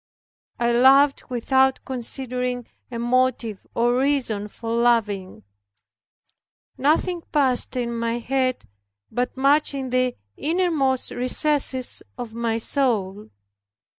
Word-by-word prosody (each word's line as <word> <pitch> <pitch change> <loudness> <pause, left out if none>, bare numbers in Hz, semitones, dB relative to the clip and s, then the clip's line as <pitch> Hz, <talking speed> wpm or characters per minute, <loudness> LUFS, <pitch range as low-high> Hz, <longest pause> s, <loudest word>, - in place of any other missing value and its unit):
I 240 0 +2
loved 270 +4 +5
without 265 +2 +1
considering 250 -1 -3 0.2
a 240 - -5
motive 240 -3 0
or 240 +1 +2
reason 260 -7 0
for 225 +2 -7
loving. 225 -5 +1 1.3
Nothing 325 +5 +1
passed 265 -5 +1
in 240 -1 -2
my 230 0 -1
head, 255 - -1 0.5
but 250 +1 -2
much 280 +2 +3
in 265 -2 -4
the 255 -1 +1 0.2
innermost 305 -6 0
recesses 260 0 0 0.2
of 240 -3 -6
my 230 -1 -1
soul. 215 -6 -1
250 Hz, 105 wpm, -23 LUFS, 235-270 Hz, 1.3 s, loved